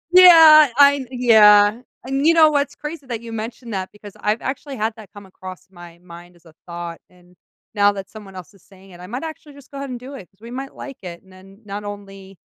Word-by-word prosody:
Yeah! 320 -5 +8
I 280 -1 +4
yeah, 220 -3 +4 0.2
and 270 +3 -1
you 335 - +4
know 315 -2 +5
what's 285 -1 -2
crazy 300 -3 -9
that 230 -2 -6
you 230 -1 -10
mentioned 225 +1 -8
that 190 -1 -5
because 205 -1 -14
I've 210 +2 -2
actually 275 +1 -6
had 220 +1 -2
that 215 -4 -14
come 205 -1 -14
across 185 -1 -12
my 175 -2 -15
mind 175 0 -15
as 175 0 -27
a 160 - -19
thought, 170 -1 -8
and 180 0 -25 0.4
now 205 -1 +3
that 195 -1 -9
someone 205 -3 -13
else 185 0 -12
is 195 - -23
saying 195 0 -20
it, 175 - -15
I 180 - -11
might 250 +8 -7
actually 315 -2 -10
just 280 -1 -18
go 280 - -10
ahead 275 - -7
and 250 -1 -7
do 260 +3 -11
it 250 -10 -12
'cause 195 - -39
we 235 +1 -12
might 270 +2 -8
like 275 -2 -10
it, 175 -1 -10
and 190 - -21
then 195 +3 -19
not 205 +1 -7
only 195 -2 -11
210 Hz, 240 wpm, -19 LUFS, 190-270 Hz, 0.4 s, Yeah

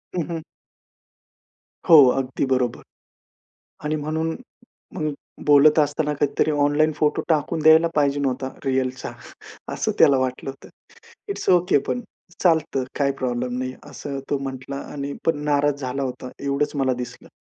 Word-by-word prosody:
हं, 180 - +1
हं. 165 -1 -3 1.5
हो, 165 - +10 0.2
अगदी 135 +1 -1
बरोबर. 130 -2 0 1.0
आणि 155 +1 0
म्हणून, 160 +2 -2 0.6
मग 155 -1 -2 0.3
बोलत 150 +1 +6
असताना 150 0 +1
काहीतरी 145 +2 +1
ऑनलाईन 145 +1 +2
फोटो 150 -1 +1
टाकून 160 0 +1
द्यायला 160 +1 +7
पाहिजे 145 -1 +2
नव्हता 130 -1 -1 0.2
रीअलचा, 130 -1 -1 0.6
असं - - -1
त्याला 140 -2 +6
वाटलं 130 +1 -2
होतं. 135 - -11 0.6
इट्स 400 - -3
ओके 180 -2 +4
पण, 245 - -1 0.4
चालतं 160 -6 +2 0.2
काही 140 -1 +3
प्रॉब्लेम 125 0 -2
नाही 130 0 -3 0.2
असं 140 0 -6
तो 145 - +1
म्हंटला 135 0 -6 0.2
आणि 140 -1 -4
पण 165 - +2
नाराज 145 -1 +1
झाला 135 +1 -2
होता 130 -1 -5
एवढंच 140 +1 0
मला 135 -2 +1
दिसलं. 125 0 -8
145 Hz, 140 wpm, -23 LUFS, 130-155 Hz, 1.5 s, हो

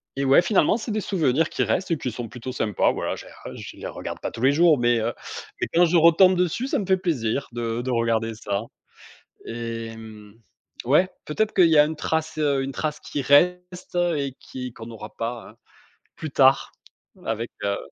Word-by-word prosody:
et 140 - -1
ouais, 135 +6 +6
finalement, 195 +1 +3
c'est 225 0 -5
des 215 0 -1
souvenirs 160 -5 +1
qui - - -1
restent 190 - -1
et 165 - +1
qui 130 -3 -4
sont 115 +1 -6
plutôt 125 +1 -7
sympas. 110 -5 +1
Voilà, - - -3
je - - -10
les - - -11
je - - -9
les - - -6
regarde - - -6
pas - - -2
tous 115 - -9
les 135 - +6
jours, 160 0 +5
mais 120 -1 +2
heu, 115 +2 -1 0.6
quand 175 +1 +6
je 170 +1 +3
retombe 170 +3 +6
dessus, 180 +9 0
ça - - 0
me 200 - -2
fait 190 0 +3
plaisir 140 - -1
de 115 0 -3
de 130 - -4
regarder 115 -2 0
ça 100 -3 -3 0.8
et 115 -1 -5
mmh. 110 -2 -12 0.5
Ouais, 160 +9 +4 0.2
peut-être 215 +8 -1
qu'il 180 -3 +6
y 160 - +4
a 150 - +8
une 160 +1 -4
trace, 160 +1 -2
heu, 140 -3 +1
une 135 - -4
trace 155 +2 -3
qui 145 - -4
reste 180 +6 +2 0.2
et 140 -2 -3
qui 125 -1 -7
qu'on 115 0 -10
aura 110 -1 -9
pas 115 0 -5
hein, - - -18 0.6
plus 155 -3 -6
tard, 135 0 +4 0.5
avec, 115 +1 -2
heu, 100 0 0
135 Hz, 205 wpm, -24 LUFS, 115-170 Hz, 0.8 s, a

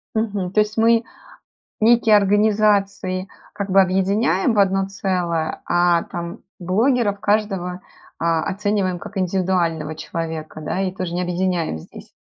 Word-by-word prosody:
Мгм. 205 -5 -1
То 215 - +2
есть 210 +1 0
мы 230 +1 +4 0.8
некие 225 -1 +5
организации 200 -2 +2 0.2
как 200 -1 -5
бы 195 +1 +6
объединяем 195 +4 +1
в - - -1
одно 195 0 +2
целое, 175 -5 -2
а 175 -1 +2
там 170 +4 -6 0.2
блогеров 205 +3 +1
каждого, 195 -4 -1 0.4
а, 165 -1 +1
оцениваем 200 -2 -1
как 200 - -8
индивидуального 175 -4 0
человека, 160 -1 -5
да, 155 +4 -3
и 185 -1 -1
тоже 185 -2 -4
не 180 - -1
объединяем 180 - -1
здесь? - - -13
190 Hz, 135 wpm, -21 LUFS, 175-205 Hz, 0.8 s, бы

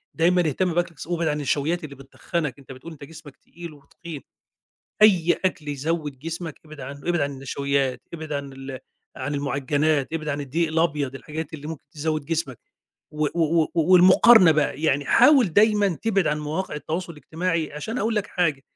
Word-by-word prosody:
دايمًا 175 +2 +3
اهتم 175 +4 0
بأكلك 170 -4 -2
ص - - -8
وابعد 170 -2 -1
عن 150 -1 0
النشويّات 150 +4 -1
اللي 140 -2 -8
بتتخنّك، 140 +1 -4
أنت 135 - -13
بتقول 135 +6 -10
أنت 155 -3 -12
جسمك 150 -2 -12
تقيل 170 -1 -11
وتخين، 150 +1 -11 0.8
أي 180 -5 +5
أكل 160 -5 -2
يزوّد 145 -1 -3
جسمك 165 0 -6
ابعد 155 -1 -12
عنّه، 140 +2 -8
ابعد 175 -3 +1
عن 145 - -1
النشويّات، 135 -1 -2
ابعد 160 -2 -7
عن 140 -1 -5
ال 135 -1 -8 0.4
عن 145 +2 -3
المعجنّات، 145 +1 0
ابعد 155 -2 -3
عن 145 -1 -2
الدقيق 160 +5 -1
الأبيض، 150 -4 0
الحاجات 150 +3 -7
اللي 150 -1 -7
ممكن 160 -2 -7
تزوّد 155 -1 -2
جسمك، 155 -6 -3 0.5
و 150 0 -1
و 165 -1 +2
و - - -2
والمقارنة 185 +4 +7
بقى، 150 -1 0
يعني 145 -2 +1
حاول 270 - +5
دايمًا 205 -3 +3
تبعد 200 -6 +1
عن 150 0 0
مواقع 155 +4 -3
التواصل 170 +4 -4
الاجتماعي 165 +1 -3
عشان 220 +12 -5
هاقول 225 +2 0
لك 210 -2 -1
حاجة، 150 -7 -1
155 Hz, 175 wpm, -24 LUFS, 140-170 Hz, 0.8 s, والمقارنة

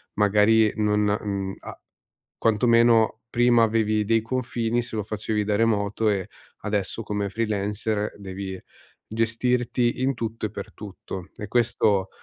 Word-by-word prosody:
magari 105 +1 +4
non, 105 -1 +1 0.2
mhmm, 100 -2 -3
a - - -10 0.6
quantomeno 115 0 +3
prima 120 0 +4
avevi 110 -1 +1
dei 115 +2 +2
confini 120 0 -1
se 120 -1 -6
lo 105 - -1
facevi 105 0 -2
da 105 0 +1
remoto 110 -1 +1
e 100 -3 -1 0.4
adesso 105 +1 -2
come 105 -1 -2
freelancer 105 0 -2
devi 95 -1 -6 0.5
gestirti 120 +2 0
in 135 +1 +2
tutto 115 -2 -4
e - - -13
per 100 -2 -8
tutto, 95 -3 -8
e 105 - -6
questo 105 -5 +1
110 Hz, 130 wpm, -24 LUFS, 105-115 Hz, 0.6 s, magari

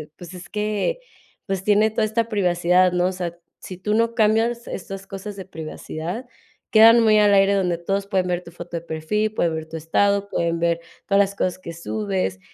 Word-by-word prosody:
pues, 175 0 -11
es 180 0 -10
que, 215 - -1 0.5
pues 190 -2 -3
tiene 210 +1 +4
toda 220 0 +1
esta 225 +1 -1
privacidad, 180 -3 +2
¿no? 180 0 +2
O 185 - -1
sea, 175 -2 -5 0.2
si 185 - -8
tú 210 +3 -2
no 230 +1 +1
cambias 225 +2 +2
estas 195 +1 -7
cosas 195 +2 -7
de 195 - -7
privacidad, 165 +4 -6 0.5
quedan 230 +1 +7
muy 215 -1 +5
al 205 -1 +5
aire 195 0 +5
donde 180 -3 +1
todos 195 +3 -2
pueden 190 -3 0
ver 180 0 -1
tu 170 - -11
foto 175 0 -7
de - - -5
perfil, 170 +7 -2
pueden 170 -6 0
ver 160 0 -5
tu 160 - -9
estado, 200 +5 +1
pueden 170 -2 -1
ver 170 0 +1 0.3
todas 200 0 +2
las 200 0 +2
cosas 185 -1 -1
que 170 -2 -8
subes. 100 - -3
190 Hz, 200 wpm, -22 LUFS, 170-210 Hz, 0.5 s, quedan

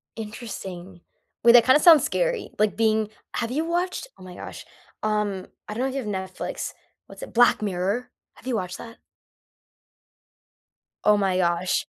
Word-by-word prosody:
Interesting. 195 -5 -8 0.4
Wait, 235 0 +8
that 240 -1 +8
kinda 260 +3 +6
sounds 320 -1 +8
scary, - - -1
like, 210 -3 +2
being 220 -1 +2 0.3
have 230 - -1
you 305 +5 -1
watched 355 +7 -2
oh - - -14
my 180 -1 -10
gosh, - - -9 0.4
um, 210 -3 -1 0.2
I 210 - -5
don't 235 +4 -2
know 265 - 0
if 265 - -6
you've 270 -4 -3
Netflix. 190 -2 -4 0.3
What's - - -11
it - - -9
Black 240 -1 +5
Mirror! 200 +4 -1 0.3
Have - - -19
you 255 - 0
watched 180 -3 -3
that? 230 0 -11 2.1
Oh 210 0 +5
my 190 -2 +1
gosh. 175 0 +1
215 Hz, 160 wpm, -24 LUFS, 190-250 Hz, 2.1 s, Wait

